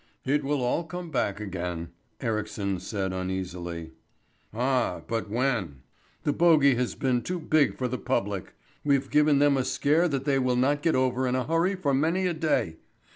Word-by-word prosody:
"It 145 +2 +1
will 140 -1 0
all 125 +7 0
come 175 +1 -7
back 115 -7 -1
again," 90 -4 -4 0.3
Ericsson 105 -5 -2
said 95 -2 -3
uneasily. 90 -3 -4 0.6
"Ah, 125 +2 0
but 115 -3 -2
when? 110 - -1 0.4
The 145 - +1
bogey 155 -5 +5
has 125 0 -1
been 125 -2 +1
too 180 +5 -3
big 155 -2 +2
for 130 - -1
the 125 +1 -3
public. 105 -7 -2 0.3
We've 140 -2 +1
given 150 -1 +4
them 145 -1 +4
a 130 - +1
scare 155 +6 +2
that 135 -4 -2
they 140 -2 +2
will 125 -1 +1
not 140 +4 +2
get 165 - +2
over 130 0 +1
in 125 - 0
a 130 - 0
hurry 165 +5 +1
for 150 -7 0
many 165 +7 +1
a 180 - +1
day. 155 - 0
130 Hz, 180 wpm, -27 LUFS, 105-145 Hz, 0.6 s, bogey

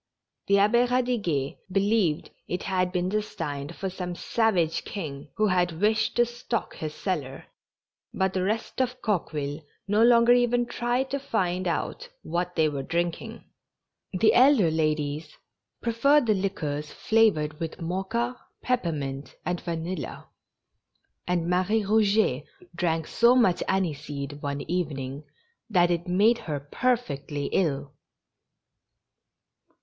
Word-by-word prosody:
The 200 - +4
Abbe 210 +4 +4
Ead 250 0 +1
iguet 170 - -1
believed 195 -4 +1 0.2
it 180 - -3
had 185 -1 0
been 180 0 0
destined 165 -7 -3
for 195 - -3
some 180 -1 -5
savage 180 -7 +1
king, 145 -8 -6
who 215 - +3
had 180 -4 +1
wished 215 +1 +2
to 240 - +4
stock 240 -1 -4
his 155 -1 -5
cellar; 145 -9 -3 0.7
but 190 0 0
the 185 - 0
rest 215 +6 -1
of 255 0 -1
Coqueville 155 -7 -2 0.3
no 210 +2 +2
longer 235 0 +6
even 245 0 +3
tried 240 +2 -1
to 280 - -1
find 185 -8 -1
out 480 - -3
what 175 +2 -2
they 160 -2 +3
were 145 -2 -3
drinking. 175 +9 -3 0.7
The 195 +4 +3
elder 250 - +5
ladies 155 -1 -1 0.5
preferred 265 +5 +3
the 220 - +3
liquors 155 -7 -3
flavored 160 -10 +2
with 165 +2 -5
mocha, 195 +8 -2 0.3
peppermint, 150 - -2
and 180 -1 -2
vanilla; 170 0 -5 1.0
and 175 -2 0
Marie 185 +5 +2
Eouget 205 -9 +2 0.3
drank 165 -2 0
so 235 +7 +4
much 210 -9 +3
aniseed 145 -6 -2
one 140 0 -3
evening 145 -5 -3 0.4
that 175 -4 +4
it 175 +1 -1
made 210 +6 +4
her 150 -3 -4
perfectly 145 - -2
ill. 145 -6 0
180 Hz, 125 wpm, -26 LUFS, 155-225 Hz, 1.0 s, longer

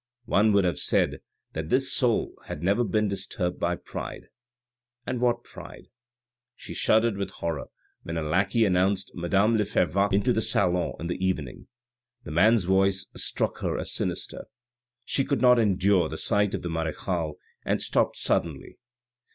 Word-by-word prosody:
One 110 -1 +3
would 100 -1 +4
have 90 -5 0
said - - +1 0.3
that 80 0 -4
this 130 +4 +3
soul 120 -4 +1
had 75 - -6
never 100 +6 +2
been 110 -2 +1
disturbed 90 -2 -3
by 85 0 0
pride - - -8 0.8
(and 125 - -3
what 120 -1 +1
pride - - -12 0.3
!) 120 +1 -66
She - - -9
shuddered 110 -1 +2
with 100 -1 -3
horror 85 -6 -4 0.4
when 80 0 -5
a 80 - -1
lackey 95 +8 +2
announced 95 +1 +1
madame 100 +6 +2
le 105 - +2
Fervaques 100 0 +1
into 100 +6 +2
the 110 - +1
salon 90 -4 +1
in 85 - -5
the 90 +2 -3
evening. 80 -9 -3 0.6
The - - -8
man's 105 +6 +4
voice 95 +1 +2
struck - - -1
her - - -2
as - - -4
sinister. - - -3 0.6
She 135 - +1
could 140 0 -1
not 125 -1 +6
endure 95 -5 +2
the 80 - -5
sight 105 0 +1
of - - -6
the 85 - -3
marechale, 80 0 -2 0.3
and - - 0
stopped - - 0
suddenly. - - -2
100 Hz, 165 wpm, -26 LUFS, 90-110 Hz, 0.8 s, not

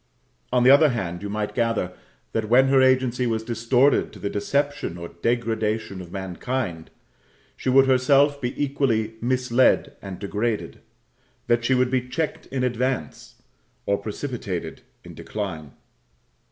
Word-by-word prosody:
On 125 -1 +3
the 130 - +7
other 150 +2 +7
hand, 90 -8 -3
you 100 - -5
might 105 0 -3
gather, 115 -6 0 0.4
that 110 -1 -2
when 130 +3 +5
her 135 -1 +5
agency 130 -1 +2
was 110 -1 -1
distorted 120 +4 +2
to - - -13
the 100 - -4
deception 140 -2 -1
or 85 -1 -7
degradation 110 -1 -2
of 85 -1 -11
mankind, 95 -1 -4 0.7
she - - -3
would 135 +1 +6
herself 140 +2 +3
be 125 0 -3
equally 135 -6 0
misled 125 0 +2
and 95 -2 -7
degraded 105 +2 -3 0.6
that 120 0 +2
she 130 +2 +2
would 125 0 +2
be 125 -1 -1
checked 160 +3 -3
in 130 -1 -2
advance, 125 +1 -2 0.5
or 100 - +2
precipitated 105 -3 -5 0.2
in - - -11
decline. 90 -8 -5
120 Hz, 140 wpm, -24 LUFS, 105-130 Hz, 0.7 s, the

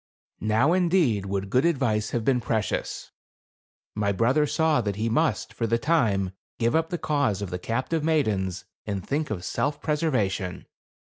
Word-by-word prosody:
Now, 110 - +2
indeed, 170 - +2
would 100 0 -3
good 130 - +3
advice 125 -10 +1
have 115 -2 -2
been 130 -3 +3
precious. 110 -1 -2 0.8
My 100 -1 0
brother 130 +9 +2
saw 160 -3 +2
that 100 -3 -2
he 110 +3 -1
must, 155 +8 0
for 115 - -1
the 115 +1 +2
time, 110 - +1 0.3
give 115 +2 +1
up 160 0 +1
the 175 - -2
cause 140 - 0
of 95 - -5
the 90 - -3
captive 130 - -1
maidens, 105 - 0 0.2
and 100 -2 -3
think 150 +3 -1
of 95 -5 -4
self 145 0 -1
preservation. 110 - -1
115 Hz, 160 wpm, -26 LUFS, 100-150 Hz, 0.8 s, good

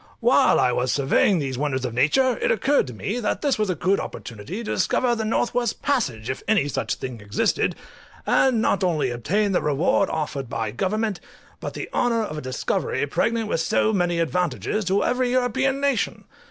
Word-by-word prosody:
While - - +4
I 125 - +3
was 125 +1 0
surveying 145 +7 +3
these 135 -4 -3
wonders 135 -3 -1
of 120 - -3
nature 240 - +3
it - - 0
occurred 290 - +2
to 125 - -7
me 205 - -3
that 215 +5 -2
this 280 -6 +1
was 210 -2 +1
a 185 - 0
good 190 +4 +1
opportunity 130 - -7
to 215 - -4
discover 250 -2 +1
the 225 -2 -2
north 225 +2 0
west 240 -3 -1
passage, 135 - -1
if 130 - -3
any 205 -9 +3
such - - -2
thing 125 -4 -7
existed, 100 0 0 0.5
and 245 -4 +3
not 195 - +1
only 160 -8 +1
obtain 200 - 0
the 185 - +1
reward 150 +6 +1
offered 145 -5 -3
by 110 -3 -2
government, 210 - -1 0.4
but - - -6
the - - -5
honour 230 -2 +1
of 155 - -5
a - - -8
discovery 130 +1 -1
pregnant 225 +10 0
with 165 - -1
so 215 +6 +1
many 175 -3 +1
advantages 170 - -1
to 195 +2 +2
every 250 0 +1
European 260 +2 +1
nation. 280 -3 0
190 Hz, 195 wpm, -23 LUFS, -, 0.5 s, While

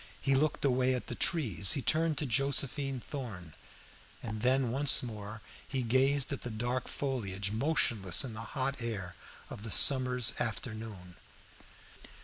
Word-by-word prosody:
He 135 - 0
looked 145 +2 0
away 130 -1 +1
at 125 - -6
the - - -7
trees; 105 - +3
he 135 - -2
turned 160 -1 +1
to 150 - -3
Josephine 135 +1 +1
Thorn; 105 - -8 0.7
and 110 -2 -6
then 130 0 +1
once 140 +2 +2
more 110 -2 -8 0.3
he 130 -2 -3
gazed 130 +3 +1
at 140 - -6
the 120 - -6
dark 120 +3 -4
foliage, 100 -8 -4
motionless 115 - +2
in 120 - -8
the 110 - -8 0.2
hot 135 0 -2
air 100 -6 -5 0.4
of - - -9
the 110 - -7
summer's 125 +2 +5
afternoon. 110 -5 -6
125 Hz, 145 wpm, -30 LUFS, 110-135 Hz, 0.7 s, summer's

